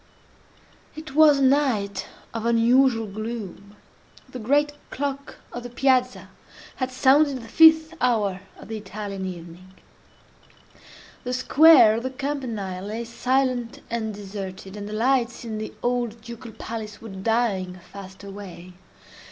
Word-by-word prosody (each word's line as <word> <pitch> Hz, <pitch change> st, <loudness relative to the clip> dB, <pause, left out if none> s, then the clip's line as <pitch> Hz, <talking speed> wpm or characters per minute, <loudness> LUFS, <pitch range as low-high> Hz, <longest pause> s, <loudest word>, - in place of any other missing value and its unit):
It 310 Hz, -2 st, -9 dB
was 300 Hz, -1 st, +6 dB
a 275 Hz, -, +1 dB
night 260 Hz, -8 st, +1 dB, 0.3 s
of 230 Hz, -1 st, -4 dB
unusual 235 Hz, 0 st, +4 dB
gloom. 210 Hz, -1 st, -7 dB, 0.5 s
The 255 Hz, -, -8 dB
great 290 Hz, +6 st, +2 dB, 0.2 s
clock 280 Hz, 0 st, -4 dB, 0.2 s
of 245 Hz, -, -5 dB
the 245 Hz, -, -8 dB
Piazza 255 Hz, 0 st, +1 dB, 0.5 s
had 255 Hz, -1 st, -1 dB
sounded 275 Hz, +2 st, +4 dB
the -, -, -11 dB
fifth 320 Hz, +4 st, +6 dB
hour 210 Hz, -7 st, +1 dB, 0.2 s
of -, -, -12 dB
the 220 Hz, -, -4 dB
Italian 200 Hz, -1 st, -6 dB
evening. 180 Hz, +1 st, -10 dB, 1.5 s
The 250 Hz, -1 st, -3 dB
square 270 Hz, -2 st, +7 dB
of -, -, -3 dB
the 260 Hz, -, -3 dB
Campanile 250 Hz, -9 st, -4 dB
lay 220 Hz, +3 st, -4 dB
silent 250 Hz, 0 st, -1 dB
and 225 Hz, -2 st, -2 dB
deserted, 195 Hz, -1 st, -8 dB
and 205 Hz, 0 st, -6 dB
the -, -, -6 dB
lights 240 Hz, +1 st, 0 dB
in 220 Hz, -2 st, -4 dB
the 215 Hz, -, -5 dB
old 240 Hz, -2 st, -1 dB
Ducal 235 Hz, 0 st, -10 dB
Palace 215 Hz, -2 st, -7 dB
were 225 Hz, -, -10 dB
dying 195 Hz, -2 st, -1 dB, 0.2 s
fast 195 Hz, -1 st, -10 dB
away. 195 Hz, -3 st, -10 dB
230 Hz, 135 wpm, -24 LUFS, 205-260 Hz, 1.5 s, square